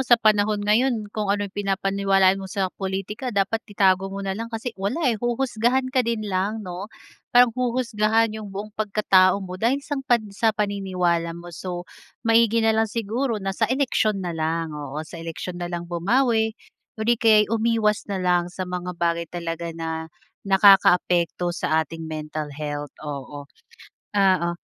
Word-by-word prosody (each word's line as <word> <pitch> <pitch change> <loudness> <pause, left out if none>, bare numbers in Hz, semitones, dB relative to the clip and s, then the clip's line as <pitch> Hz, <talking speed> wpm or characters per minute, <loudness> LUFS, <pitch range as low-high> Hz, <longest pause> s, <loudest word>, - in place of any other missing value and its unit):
sa 240 -1 +6
panahon 215 -1 +3
ngayon 215 -1 +1
kung 210 -2 -2
ano 205 +1 +1
'yong 200 - -8
pinapaniwalaan 195 -1 +2
mo 190 - -7
sa 190 -2 -2
pulitika 195 +5 -4
dapat 205 0 0
itago 195 -1 +2
mo 195 0 -6
na 195 - -1
lang 230 +4 -5
kasi 225 +1 -5
wala 200 +9 -1 0.2
eh. 215 - -5
Huhusgahan 245 +1 0
ka 255 - +3
din 230 -3 -1
lang 205 +3 -2
'no, 180 +3 -6 0.4
parang 245 -1 +5
huhusgahan 230 -3 +1
'yong 215 -2 -7
buong 200 +2 -7
pagkatao 195 -2 +3
mo 185 0 -8
dahil 235 +4 +2
sang 290 -2 -3
pan 240 -4 +2
sa 220 +1 +1
paniniwala 180 -5 -1
mo. 175 0 -10
So 175 +1 -5 0.4
maigi 230 0 +4
na 225 - +4
lang 220 0 +1
siguro 230 +2 -2
na 195 -1 -3
sa 220 +3 0
eleksiyon 220 -7 +1
na 175 - -2
lang. 160 0 -2
Oo, 150 +1 -5
sa 165 +1 -10
eleksiyon 175 +2 -6
na 175 - -3
lang 175 0 -4
bumawi 220 +6 +1 0.4
or 220 - -3
di 235 0 +2
kaya'y 215 -1 +5
umiwas 220 -2 +1
na 200 - -2
lang 180 -1 +1
sa 185 +1 -5
mga 180 -1 -5
bagay 170 -1 -1
talaga 170 -1 -4
na 160 0 -4 0.4
nakakaapekto 180 -3 +4
sa 160 -2 +1
ating 165 +2 -8
mental 155 -1 -5
health, 145 0 -5
oo, 145 0 -6 0.7
oo. 190 -4 +3
195 Hz, 170 wpm, -23 LUFS, 175-220 Hz, 0.7 s, sa